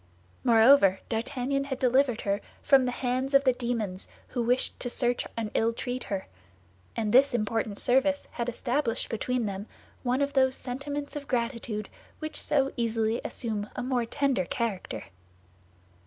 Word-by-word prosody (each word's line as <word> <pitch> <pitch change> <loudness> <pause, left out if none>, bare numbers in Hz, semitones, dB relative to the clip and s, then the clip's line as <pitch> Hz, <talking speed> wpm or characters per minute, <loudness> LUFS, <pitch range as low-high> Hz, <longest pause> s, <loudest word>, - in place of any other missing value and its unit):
Moreover, 225 -5 +6
D'Artagnan 260 +4 -1
had 270 -2 -3
delivered 255 -2 +2
her 200 +1 0 0.2
from 270 -2 +5
the 250 - 0
hands 255 +2 -1
of 275 - +6
the 260 -2 +4
demons 230 -6 -3 0.2
who 245 - -2
wished 245 +2 +1
to 245 - -3
search 245 0 0
and 220 -2 -2
ill 230 +1 +2
treat 250 +1 -4
her; 195 -2 -3 0.7
and 215 -2 -1
this 265 0 +6
important 215 -2 -1
service 275 +3 +2
had 240 0 -2
established 245 +1 -1
between 245 +1 -1
them 200 +1 -4 0.3
one 255 +2 +1
of 280 0 -2
those 260 -2 +3
sentiments 285 +4 -4
of 285 -1 -5
gratitude 235 -4 -2 0.3
which 310 0 -4
so 275 -2 +1
easily 225 -1 0
assume 215 -4 -3
a 250 - -3
more 250 -2 0
tender 275 -8 +1
character. 215 -1 -3
245 Hz, 155 wpm, -28 LUFS, 225-270 Hz, 0.7 s, Moreover